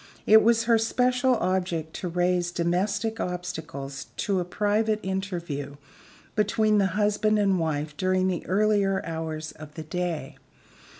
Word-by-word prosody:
It 220 +1 +8
was 230 +1 +3
her 230 -1 +4
special 250 +3 +2
object 180 -5 -1
to 185 - -4
raise 175 0 +1
domestic 200 +6 -1
obstacles 160 -6 -5
to 195 -2 0
a - - 0
private 210 +4 0
interview 170 -7 -4 0.6
between 210 0 +2
the 195 - +3
husband 215 +1 +2
and 195 -3 +2
wife 150 -2 -2
during 185 0 +1
the 180 -2 -1
earlier 200 0 +2
hours 160 -1 -4
of 150 -1 -12
the 160 - -6
day. 175 0 -4
185 Hz, 135 wpm, -26 LUFS, 165-210 Hz, 0.6 s, It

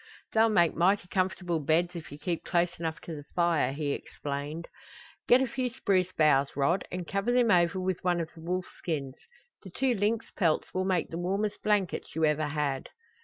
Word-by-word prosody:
"They'll 225 0 +5
make 175 -6 +4
mighty 180 +2 +2
comfortable 185 -2 0
beds 165 +4 +1
if 165 -2 -8
you 145 - -8
keep 170 +1 -3
close 175 -1 0
enough 165 -1 -3
to 165 - -7
the 145 - -8
fire," 170 -6 +2
he 145 +1 -2
explained. 145 +4 -5 0.6
"Get 255 +2 +6
a - - +2
few 250 +1 -2
spruce 190 -6 +1
boughs, 145 -4 +3
Rod, 165 +7 +2
and 180 -1 -4
cover 200 +4 0
them 245 -2 +4
over 175 +1 +3
with 185 -1 -2
one 175 -1 +2
of 165 -1 -3
the 165 - -13
wolf 180 +2 -2
skins. 140 -6 -3 0.5
The 190 - -10
two 255 +7 +1
lynx 220 +2 -1
pelts 165 -5 0
will 185 0 0
make 185 -3 0
the 165 - -5
warmest 200 +4 -1
blankets 205 -4 0
you 160 0 +3
ever 150 0 +1
had." 145 -2 -2
175 Hz, 195 wpm, -29 LUFS, 155-195 Hz, 0.6 s, Get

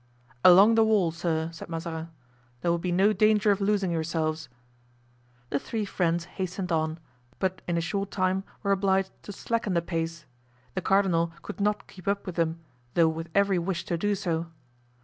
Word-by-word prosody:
"Along 195 +5 +8
the 225 0 +5
wall, 210 -6 +3
sir," 160 -1 -2
said 165 - -9
Mazarin, 165 0 -4 0.5
"there 170 - +1
will 170 - +1
be 180 +1 -2
no 195 +4 +4
danger 215 -1 +4
of 200 0 0
losing 200 -2 +1
yourselves." 160 -2 -2 1.0
The 140 - +1
three 220 +5 -3
friends 170 -3 0
hastened 185 0 -4
on, 160 -1 0 0.4
but 190 -1 -1
in 175 -1 0
a - - +1
short 195 +4 -2
time 185 0 0 0.2
were 200 - +1
obliged 195 -1 +2
to - - -8
slacken 220 -1 -2
the 170 - +3
pace. 165 -2 -3 0.5
The 190 - -2
cardinal 180 -4 +2
could 210 - -7
not 210 +1 0
keep 185 -1 -15
up 200 0 0
with 185 - -4
them, 165 0 -1 0.3
though 165 -2 +5
with 165 +1 -5
every 200 -2 +3
wish 175 +1 -2
to 170 - -1
do 205 +4 0
so. 170 -4 -2
180 Hz, 180 wpm, -27 LUFS, 165-200 Hz, 1.0 s, Along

